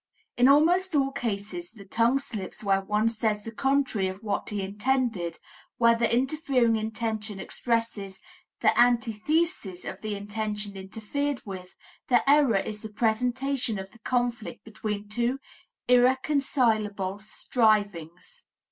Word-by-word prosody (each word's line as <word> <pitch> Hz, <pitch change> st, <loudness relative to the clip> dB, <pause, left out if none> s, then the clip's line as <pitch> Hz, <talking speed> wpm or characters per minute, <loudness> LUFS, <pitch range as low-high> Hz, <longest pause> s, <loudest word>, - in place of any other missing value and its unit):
In 245 Hz, +1 st, +5 dB
almost 335 Hz, +5 st, +4 dB
all 275 Hz, -1 st, +2 dB
cases 200 Hz, -5 st, -4 dB
of 200 Hz, -2 st, -13 dB
tongue 235 Hz, +4 st, +3 dB
slips 225 Hz, -7 st, -5 dB
where 195 Hz, -1 st, +2 dB
one 210 Hz, +3 st, +1 dB
says 215 Hz, -2 st, 0 dB
the 225 Hz, -, -6 dB
contrary 270 Hz, -5 st, +1 dB
of 190 Hz, +3 st, -7 dB
what 205 Hz, -2 st, -2 dB
he 205 Hz, -2 st, -2 dB
intended, 210 Hz, -4 st, -1 dB, 0.4 s
where 230 Hz, -1 st, +5 dB
the 230 Hz, 0 st, +1 dB
interfering 255 Hz, -2 st, +2 dB
intention 220 Hz, -1 st, -3 dB
expresses 225 Hz, -5 st, -2 dB, 0.4 s
the -, -, +4 dB
antithesis 240 Hz, -, +1 dB
of 190 Hz, -, -6 dB
the 215 Hz, -1 st, -3 dB
intention 210 Hz, 0 st, -4 dB
interfered 225 Hz, +9 st, -3 dB
with, 185 Hz, -3 st, -8 dB, 0.3 s
the 245 Hz, +1 st, +3 dB
error 280 Hz, -7 st, +5 dB
is 210 Hz, +2 st, -4 dB
the 220 Hz, -, -7 dB
presentation 245 Hz, +3 st, 0 dB
of 190 Hz, 0 st, -7 dB
the 235 Hz, -, -19 dB
conflict 240 Hz, -1 st, -2 dB
between 210 Hz, -2 st, -5 dB
two 240 Hz, +5 st, 0 dB, 0.5 s
irreconcilable 245 Hz, -6 st, +2 dB
strivings. 210 Hz, -, -1 dB
225 Hz, 130 wpm, -27 LUFS, 205-250 Hz, 0.5 s, In